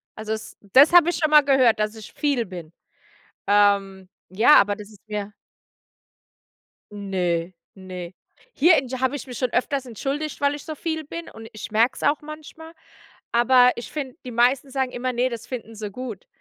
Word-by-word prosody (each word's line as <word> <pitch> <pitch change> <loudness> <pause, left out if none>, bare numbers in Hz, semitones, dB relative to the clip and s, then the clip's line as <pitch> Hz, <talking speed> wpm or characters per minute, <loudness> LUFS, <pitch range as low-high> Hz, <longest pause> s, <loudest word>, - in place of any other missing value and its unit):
Also, 215 0 -4
es 220 - -8
das 260 - +5
habe 345 -1 +7
ich - - -1
schon 310 -2 0
mal 300 - +8
gehört, 260 -5 +3
dass 215 +1 -1
ich 220 -2 -12
viel 280 -6 0
bin. 175 -4 -10 0.7
Ähm, 200 -2 +2 0.2
ja, 220 +10 +6
aber 205 0 -1
das 210 0 -11
ist 205 - -18
mir 210 -1 -5 1.6
Ne, 185 -3 -2 0.2
ne. 185 -2 -9 0.4
Hier 330 +3 +5
in 265 - -1
g 260 - -5
habe 260 +2 0
ich - - -7
mich 250 -2 -8
schon 255 -2 -1
öfters 270 +2 -1
entschuldigt, 275 +7 -4
weil 285 0 +2
ich 290 - -10
so 310 - -6
viel 315 0 -4
bin 335 +3 -8
und 225 0 -11
ich 215 - -8
merk 225 +3 +2
es - - -8
auch 290 +1 +2
manchmal, 310 +2 -11 0.6
aber 250 +1 +5
ich 235 - -7
finde, 285 -2 -6
die 250 - -6
meisten 245 +4 +2
sagen 265 -1 -1
immer, 255 +1 -3
„ne, 245 +2 +1
das 235 -1 -7
finden 230 -3 -7
sie 215 -1 -6
gut“. 235 -3 -8
245 Hz, 190 wpm, -23 LUFS, 205-280 Hz, 1.6 s, mal